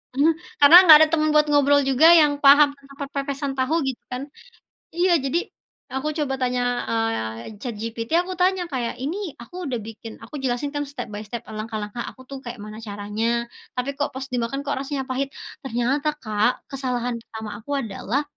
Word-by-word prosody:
eee, 300 +4 +4 0.3
karena 290 +4 +9
enggak 315 -4 +11
ada - - +4
temen 310 -1 +2
buat 300 0 +5
ngobrol 285 0 +5
juga 270 +4 +5
yang 295 -3 +4
paham 285 +1 +8
tentang 275 0 -17
perpepesan 280 0 -3
tahu 260 +5 +1
gitu 265 -2 -3
kan 250 +2 -5 0.7
iya 355 +1 +3
jadi 275 +5 -1 0.6
aku 270 +3 -2
coba 275 -3 -1
tanya, 250 0 0 0.3
eee, 210 - -2
ChatGPT, 230 0 -5
aku 370 +1 -6
tanya 370 0 +3
kayak 240 -3 -2
ini 310 +8 -2 0.3
aku 295 - -15
udah 250 - -1
bikin, 225 0 -9
aku 235 - -14
jelasin 260 +3 -1
kan 290 0 -1
step 250 -5 -6
by 205 - -5
step, 235 +2 -6 0.2
langkah-langkah 215 +1 -4
aku 260 - -15
tuh 275 - -6
kayak 240 +1 -6
mana 215 +1 -9
caranya. 205 +2 -3 0.5
Tapi 250 +2 -1
kok 285 - 0
pas 265 - -5
dimakan 245 +3 -2
kok 285 -1 -2
rasanya 275 -1 -3
pahit? 270 +2 -1 0.3
Ternyata, 265 +4 0
Kak, 215 +1 +2 0.2
kesalahan 250 -3 -2
pertama 220 -2 -8
aku 240 +6 -13
adalah 230 +6 -2
265 Hz, 175 wpm, -23 LUFS, 230-285 Hz, 0.7 s, enggak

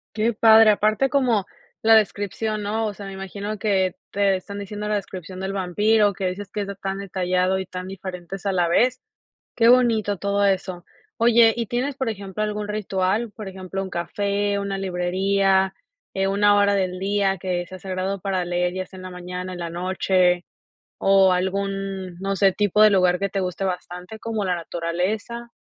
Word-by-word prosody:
Qué 225 +2 +1
padre, 220 0 +7
aparte 215 +5 +2
como 245 -8 +2 0.4
la 225 0 +6
descripción, 215 0 0
¿no? 220 +2 -1
O 205 - -3
sea, 200 0 -9
me 195 - -7
imagino 200 +2 -5
que 190 -4 +1 0.2
te 200 -1 +2
están 200 +2 -8
diciendo 210 +1 -5
la 210 - +1
descripción 185 -2 -7
del 190 +1 -3
vampiro, 205 +3 +2
que 190 0 -3
dices 190 +2 -4
que 210 - -3
es - - -4
de 200 - -5
tan 195 0 -4
detallado, 185 -1 0
y 190 - -5
tan 185 0 -7
diferentes 190 0 -7
a 200 - +1
la 175 -2 +2
vez, 245 +9 +2 0.6
qué 230 -1 +4
bonito 225 -5 +3
todo 200 +1 +1
eso. 185 -2 -1 0.3
Oye 230 -1 +5
y, 235 - -1
¿tienes, 255 +5 -2
por 265 -3 -3
ejemplo, 200 -1 -4
algún 210 0 -3
ritual, 210 +1 -1
por 210 -2 -9
ejemplo, 190 0 -5
un 190 - -5
café, 200 +3 -1
una 200 -1 -3
librería, 190 +1 +1 0.4
eh, 195 0 0
una 205 +1 +4
hora 200 0 +3
del 185 -2 -1
día 195 0 +1
que 180 -1 -2
sea 185 +2 -10
sagrado 190 +1 -3
para 190 -2 -1
leer, 175 0 0
ya 185 0 -3
sea 190 - -14
en 185 - -10
la 185 - -6
mañana, 180 +1 -6
en 175 - -8
la 170 -1 -4
noche, 180 0 +1 0.5
o 195 -1 +5
algún, 195 0 -2
no 195 0 -2
sé, 195 0 +4
tipo 205 +2 +1
de 215 - +8
lugar 185 -2 +3
que 200 - -1
te 195 - -2
guste 185 0 -3
bastante, 180 +2 -5
como 220 -2 -3
la 185 -2 0
naturaleza? 185 +8 -3
195 Hz, 190 wpm, -23 LUFS, 185-210 Hz, 0.6 s, de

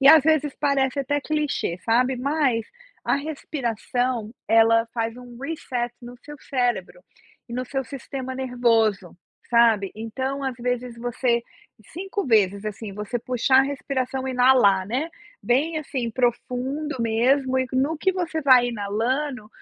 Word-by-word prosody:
E 275 - +3
às 315 0 +9
vezes 300 -3 +2
parece 280 -2 +1
até 290 +2 -1
que - - -15
clichê, 295 - -1
sabe. 250 +3 +3
Mas 265 -3 +1 0.4
a - - +2
respiração, 250 -5 -2
ela 225 +1 +5
faz 230 0 -2
um 245 -1 -11
reset 255 -5 -3
no 245 0 -10
seu 295 0 -9
cérebro, 255 - -1 0.5
e - - -9
no 250 +1 -2
seu 270 +2 -2
sistema 260 0 -6
nervoso, 230 -8 +1 0.3
sabe, 225 -5 +4
então 260 +5 -4
às 265 - -2
vezes 245 0 -2
você 240 0 0 0.5
5 390 +2 -4
vezes, 200 -4 +3
assim, 210 0 -6
você 210 +4 -4
puxar 255 +2 +3
a - - +4
respiração 265 -1 -3
inalar, 245 -7 +4
né, 260 +10 -1 0.3
bem, 280 +9 +1
assim, 260 -5 -3
profundo 255 +5 -1
mesmo 255 +4 +2
e 260 - 0
no 275 +5 +1
que 380 +5 +1
você 345 -3 -2
vai 255 -3 +6
inalando, 230 +4 -2
250 Hz, 145 wpm, -24 LUFS, 230-275 Hz, 0.5 s, às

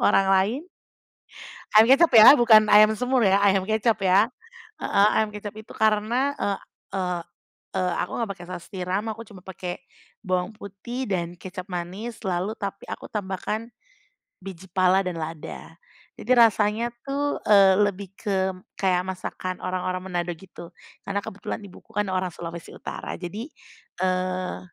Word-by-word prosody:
orang 195 - +4
lain 200 +8 +2 1.2
ayam 220 +1 +8
kecap 310 +5 +6
ya 225 +6 +11
bukan 220 -3 +6
ayam 215 +1 +7
semur 250 +2 +1
ya, 195 +1 +4
ayam 195 -1 +4
kecap 220 +1 +2
ya 190 +4 +5 0.6
heeh, 200 +1 +4
ayam 220 -1 +2
kecap 210 0 -7
itu 215 0 -11
karena, 220 +6 +1
eee 200 -1 0 0.4
eee 180 -2 -1 0.6
eee, 180 -1 0
aku - - -6
nggak 230 -3 -2
pake 175 - -10
saus 180 -2 -7
tiram 185 +2 -2
aku 220 +1 -8
cuma 195 -2 -13
pake 180 -1 -6 0.4
bawang 185 0 -1
putih 220 +6 -6
dan 175 -2 -2
kecap 185 0 -8
manis, 185 +7 -5
lalu 185 +2 -1
tapi 200 -1 -5
aku - - -7
tambahkan 210 +3 -3 0.7
biji 190 -1 -9
pala 185 +1 +3
dan 180 - -2
lada. 160 0 -7 0.4
Jadi 235 - -8
rasanya 225 0 +3 0.2
tuh, 285 +1 -1
eee, 195 -2 +7
lebih 200 -1 -7
ke 190 -3 0 0.3
kayak 185 -2 +1
masakan 185 0 -5
orang-orang 185 0 -2
Manado 175 -1 -2
gitu 175 -1 -12 0.4
karena 200 0 -1
kebetulan 195 -1 -6
ibuku 195 - -15
kan 210 0 +1
orang 185 0 0
Sulawesi 170 0 -8
Utara - - -6
jadi, 195 +7 -6 0.6
eee, 185 - -1
195 Hz, 150 wpm, -25 LUFS, 185-215 Hz, 1.2 s, ya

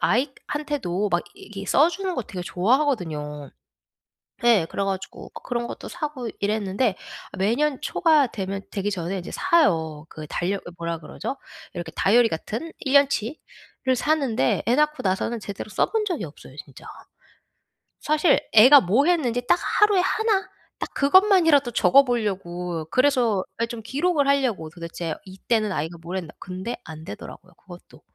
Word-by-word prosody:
아이한테도 260 - -1
막 175 - +1
이 - - -14
이 195 - -5
써 300 +4 +5
주는 370 0 -3
거 250 - -2
되게 185 -3 -7
좋아하거든요. 180 - -1 0.9
예 220 -9 +5
그래가지고 195 -1 -4
그 - - -9
그런 240 -1 -3
것도 - - -8
사고 295 -8 -5
이랬는데 205 +1 0 0.4
매년 255 +9 +1
초가 310 -6 +3
되면 195 -1 -4
되기 205 0 -2
전에 185 0 -3
이제 175 - -7
사요. 160 - +1
그 155 -1 -9
달력 190 +2 -2
어 - - -7
뭐라 170 -1 -3
그러죠? 265 - -6 0.4
이렇게 170 -2 -6
다이어리 230 +3 +4
같은 225 - -5
1 270 - -3
년치를 275 -1 0
사는데 265 - +1
애 240 - +2
낳고 300 +1 +2
나서는 195 +4 -1
제대로 200 +1 -7
써 - - +1
본 445 -1 0
적이 355 - -2
없어요 145 -3 -12
진짜. 140 -2 -15 1.1
사실 305 +1 +3
애가 260 +6 +9
뭐 225 - +2
했는지 250 -9 +1
딱 - - +5 0.2
하루에 415 -3 +5
1 410 +1 0 0.3
딱 - - -6
그것만이라도 325 - +4
적어보려고 190 - +1
그래서 250 -7 +2 0.2
예 - - +3
좀 230 -1 -7
기록을 285 +5 0
하려고 250 - +1
도대체 170 0 -5
이때는 210 +3 -1
아이가 165 +1 -3
뭘 175 +3 -5
했나. 170 -4 -6
근데 185 +6 -5
안되더라고요 155 -10 -10
그것도. - - -15
225 Hz, 320 characters per minute, -24 LUFS, 180-285 Hz, 1.1 s, 애가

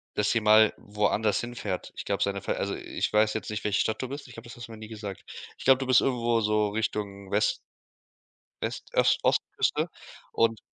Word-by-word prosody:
dass 105 0 +2
sie 115 - +2
mal 110 0 +6
woanders 105 +1 0
hinfährt. 120 -6 -4
Ich - - -5
glaube, 100 -1 -2
seine 100 -1 -1
also, - - -1
ich - - -3
weiß 105 0 +4
jetzt 110 - -4
nicht, 105 -1 -4
welche 105 -1 +1
Stadt 110 +2 0
du 130 - -4
bist, 140 +1 -7
ich 125 - -13
glaube, 115 +1 -11
das 120 - -10
hast 120 - -8
du 115 - -11
mir - - -9
nie 110 0 -9
gesagt. 105 -3 -7 0.3
Ich - - -10
glaube, 135 0 +6
du 135 -1 -4
bist 130 -2 +6
irgendwo 120 -3 +1
so 105 -1 +2
Richtung 100 -2 -3
West 105 +1 +2 1.1
West - - -4
Os - - +4
Ostküste - - +1 0.4
und 115 -1 +2
110 Hz, 205 wpm, -28 LUFS, 105-115 Hz, 1.1 s, mal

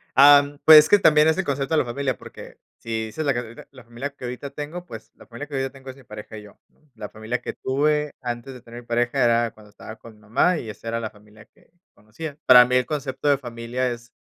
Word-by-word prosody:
Am, 145 +1 +6
pues 155 -1 +9
que 205 - +6
también 155 -3 +5
es 160 - +2
el 190 - -1
concepto 140 +2 -2
de - - +3
la - - 0
familia, 130 +1 -3
porque - - -13 0.2
si 110 -1 -4
dices 155 +7 -5
la 140 - +2
que 120 - -2
ahori 115 -1 -9 0.2
la 130 -3 -15
familia 120 +4 -6
que 125 - -9
ahorita 125 +3 -6
tengo, 155 +5 -7
pues 110 -5 -11
la - - -17
familia 130 +5 -9
que 145 - -8
ahorita 135 0 -2
tengo 135 -1 -13
es 130 - -9
mi 135 - -18
pareja 105 0 -10
y 105 - -10
yo. 105 - -17 0.4
La 105 - -8
familia 110 +3 -5
que - - -6
tuve 150 +2 -1
antes 120 +1 -6
de 125 - -12
tener 120 +1 -12
pareja 120 +2 0
era 115 -1 +2
cuando 105 -1 -19
estaba 110 +2 -11
con 115 - -14
mi - - -23
mamá 115 - +1
y 110 - -7
esa 115 - -10
era 115 0 -2
la 110 -2 -5
familia 105 +1 -19
que - - -30 0.2
conocía. 140 +8 -9
Para 125 -1 +9
mí 125 +1 -1
el 125 -1 +2
concepto 145 -1 -4
de 140 -1 +4
familia 120 0 -4
es, 120 0 -9
125 Hz, 255 wpm, -23 LUFS, 115-145 Hz, 0.4 s, pues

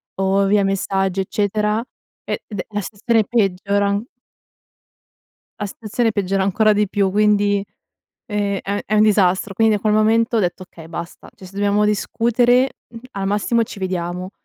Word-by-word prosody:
o 195 +1 +1
via 205 0 +3
messaggi 195 -1 0
eccetera, 210 +2 0 0.4
e - - -4
ed 205 -4 -7
è - - -3
la 205 -1 -3
stazione 220 +3 0
peggiora 200 -2 +1
an 200 +1 0 1.6
la 210 - -2
stazione 225 +3 -2
peggiora 195 -1 0
ancora 215 +3 +3
di 210 -1 +1
più, 195 -2 +1
quindi, 205 -1 +2 0.6
ehm, 205 -3 -1
è 200 +1 -3
è 215 - -1
un 210 - +5
disastro. 195 -2 +2
Quindi 220 +1 +3
a - - 0
quel 215 0 +1
momento 225 +2 +3
ho - - +3
detto: 180 0 -2
okay 165 -2 -14
basta, 170 +1 -8
cioè 190 - -13
se 185 - -14
dobbiamo 205 +1 +1
discutere 240 +5 +2 0.4
al 195 -1 -3
massimo 210 +4 +1
ci 210 -2 -7
vediamo. 180 -1 -3
205 Hz, 160 wpm, -20 LUFS, 195-215 Hz, 1.6 s, un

